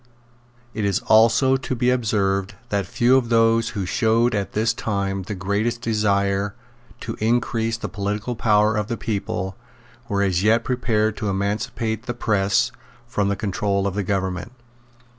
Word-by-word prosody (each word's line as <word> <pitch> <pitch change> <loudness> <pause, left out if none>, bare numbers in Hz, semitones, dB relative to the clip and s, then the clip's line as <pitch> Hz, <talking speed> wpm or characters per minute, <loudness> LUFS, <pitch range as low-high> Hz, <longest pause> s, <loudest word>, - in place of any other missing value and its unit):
It 110 - -3
is 100 -2 +1
also 115 +4 +4
to 130 -1 -4
be 125 +1 +2
observed 100 -4 0
that 100 -2 -1
few 120 +5 +3
of 120 -3 0
those 115 0 +3
who 95 - -1
showed 115 +5 +2
at 100 -2 -2
this 110 +2 +1
time 100 -2 -2
the 100 +3 -5
greatest 105 +5 -1
desire 100 -3 0 0.5
to 115 - -5
increase 115 0 0
the - - -5
political 105 +4 -3
power 105 -2 +3
of 105 -1 -1
the 115 -1 -3
people 95 -3 -3 0.5
were 100 0 +1
as 95 -3 +1
yet 110 +3 +3
prepared 110 -4 0
to 105 - -2
emancipate 105 +3 -2
the 120 - -3
press 105 +1 +1 0.3
from 105 -5 -1
the 100 - 0
control 100 0 -1
of 100 - -1
the 100 - -1
government. 95 +2 -2
105 Hz, 160 wpm, -22 LUFS, 100-115 Hz, 0.5 s, also